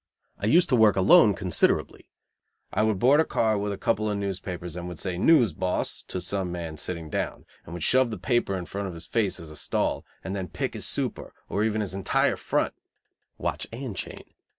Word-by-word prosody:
I 100 - -1
used 175 +10 +5
to 130 - +4
work 110 -3 +5
alone 100 +2 +6
considerably. 90 -1 0 0.6
I - - +2
would 110 -2 +2
board 135 +9 +5
a - - +6
car 110 -7 +1
with 100 0 -2
a 100 - -4
couple 110 +1 0
of 105 - -1
newspapers, 90 -3 -4
would 90 -1 -6
say, 90 +1 -3
"News, 120 - +4
boss?" 90 +2 -1
to 90 - -4
some 90 0 -2
man 85 -3 -5
sitting 85 +1 -4
down, - - -3 0.2
would 85 0 -6
shove 130 -1 +4
the 110 - -4
paper 100 0 0
in 90 - -5
front 100 +2 -4
of 90 - -7
his 85 0 -9
face 100 -6 0
as 80 -2 -9
a - - -10
stall, - - -1 0.2
and 95 +1 -4
then 95 -2 -3
pick - - -3
his - - -2
super - - -3
or 105 - 0
even 110 -1 0
his 100 -3 -3
entire 95 0 +1
"front" - - -1 0.6
(watch - - -3
and 120 -2 -6
chain). - - -6
100 Hz, 205 wpm, -26 LUFS, 90-110 Hz, 0.6 s, alone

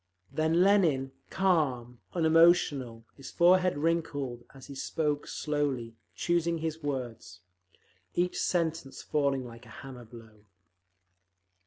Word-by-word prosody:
Then 160 +3 +2
Lenin, 165 -10 +3 0.2
calm, 135 -11 0 0.2
unemotional, 160 -8 +3
his 135 - -10
forehead 180 -1 +4
wrinkled, 145 -6 -1
as 135 -1 -13
he 140 - -9
spoke 145 +2 -2
slowly, 140 -6 -2 0.2
choosing 170 -1 0
his 160 0 -4
words; 120 - -5 0.7
each 180 +1 0
sentence 165 -5 -1
falling 140 -3 0
like 120 0 -12
a 110 - -11
hammer 125 -3 -9
blow. 110 -2 -15
145 Hz, 110 wpm, -29 LUFS, 125-165 Hz, 0.7 s, forehead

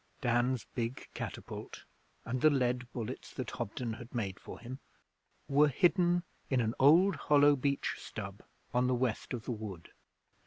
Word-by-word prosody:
Dan's 120 0 +1
big 120 +1 -3
catapult - - -7 0.4
and 125 +1 -2
the 155 - +7
lead 125 -3 0
bullets 120 +1 -5
that 130 -4 -4
Hobden 120 0 -3
had 120 +2 -10
made 100 -5 -2
for - - -9
him 125 +3 -7 0.7
were 145 +2 +5
hidden 175 +4 +3 0.3
in 130 - +2
an 115 -1 +1
old 170 +8 +6
hollow 145 0 +5
beech 140 +1 -1
stub - - -7 0.3
on 125 +1 +3
the 130 - +2
west 120 -3 -1
of 120 -3 -4
the - - -2
wood. 105 -7 -6
125 Hz, 155 wpm, -33 LUFS, 120-140 Hz, 0.7 s, the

